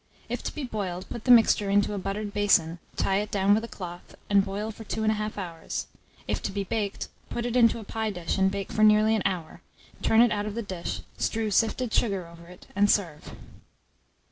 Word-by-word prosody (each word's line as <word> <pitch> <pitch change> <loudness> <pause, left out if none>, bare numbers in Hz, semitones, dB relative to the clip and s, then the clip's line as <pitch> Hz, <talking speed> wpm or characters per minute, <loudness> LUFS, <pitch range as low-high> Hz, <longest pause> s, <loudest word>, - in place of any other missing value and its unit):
If - - -3
to - - -4
be 300 - -4
boiled, 190 -7 -4
put 235 - -7
the - - -3
mixture 225 -4 +6
into 205 +1 +2
a 200 - -2
buttered 200 +2 -4
basin, 175 -5 +3 0.2
tie 195 - +1
it 210 +1 -1
down 200 -1 +3
with 220 +2 +2
a - - -4
cloth, 175 -5 -9 0.2
and 200 -1 +5
boil 205 +3 -4
for 225 - -10
2 220 +1 -3
1/2 215 -1 0
hours: 170 -5 -4 0.4
if - - -1
to - - -3
be 200 0 -2
baked, 200 0 -3 0.2
put 235 - -3
it 245 0 -2
into 235 -2 +5
a 225 - -7
pie 220 +1 -2
dish, 180 -1 -3
and 190 0 +4
bake 195 0 -4
for 215 - -1
nearly 215 +1 +5
an 215 - 0
hour; 180 -5 -3 0.4
turn 225 +1 +5
it 240 - +5
out 205 0 -1
of 210 - -5
the 235 - -2
dish, 185 -4 -5 0.2
strew 220 -1 -1
sifted 225 +2 +1
sugar 195 -6 +1
over 170 0 -14
it, 180 0 -14
and 205 0 +4
serve. 165 -8 0
205 Hz, 220 wpm, -27 LUFS, 190-220 Hz, 0.4 s, mixture